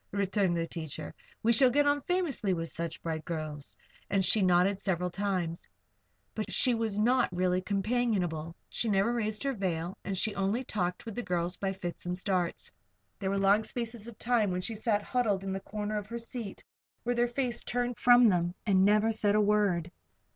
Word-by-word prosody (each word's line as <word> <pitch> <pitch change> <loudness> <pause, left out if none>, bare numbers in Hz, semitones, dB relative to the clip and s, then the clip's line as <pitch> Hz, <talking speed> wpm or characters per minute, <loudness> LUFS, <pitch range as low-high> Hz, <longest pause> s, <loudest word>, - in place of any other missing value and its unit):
returned 195 -3 +1
the 165 - 0
teacher. 160 -2 -6 0.3
"We 230 +1 +4
shall 255 +3 +6
get 290 +4 +3
on 290 0 +2
famously 295 - 0
with 165 -1 -3
such 170 -1 -4
bright 160 -1 -3
girls," 155 -3 -6 0.3
and 195 -2 +2
she 215 - +6
nodded 185 +2 +3
several 180 -2 -1
times. 180 -3 -2 0.6
But 215 - -4
she 250 - +4
was 225 -3 -1
not 245 +4 +3
really 180 0 +1
companionable. 195 -6 -1
She 230 - -1
never 200 +3 +2
raised 215 -1 -2
her 275 -1 0
veil. 180 -4 -2
And 195 -1 -3
she 215 +3 0
only 200 +5 0
talked 180 -6 -2
with 225 - -6
the 245 - -3
girls 175 -3 -2
by 195 0 -2
fits 175 -2 -6
and 180 0 -2
starts. 180 -2 -2 0.5
There 190 - -2
were 200 - 0
long 200 +2 +4
spaces 230 -1 -5
of 235 - -10
time 230 -4 +1
when 180 0 -1
she 225 - -2
sat 210 -1 0
huddled 215 -7 0
in 195 - -3
the 195 - -2
corner 210 +1 -3
of 205 - -9
her 235 +2 -5
seat, 230 -3 -7 0.4
with 245 0 0
her 240 - +4
face 240 0 -1
turned 245 -1 -2
from 245 -1 +7
them, 175 -1 0
and 190 -3 +4
never 210 +2 +4
said 210 -2 +2
a - - +4
word. 200 -5 +2
200 Hz, 195 wpm, -30 LUFS, 180-230 Hz, 0.6 s, from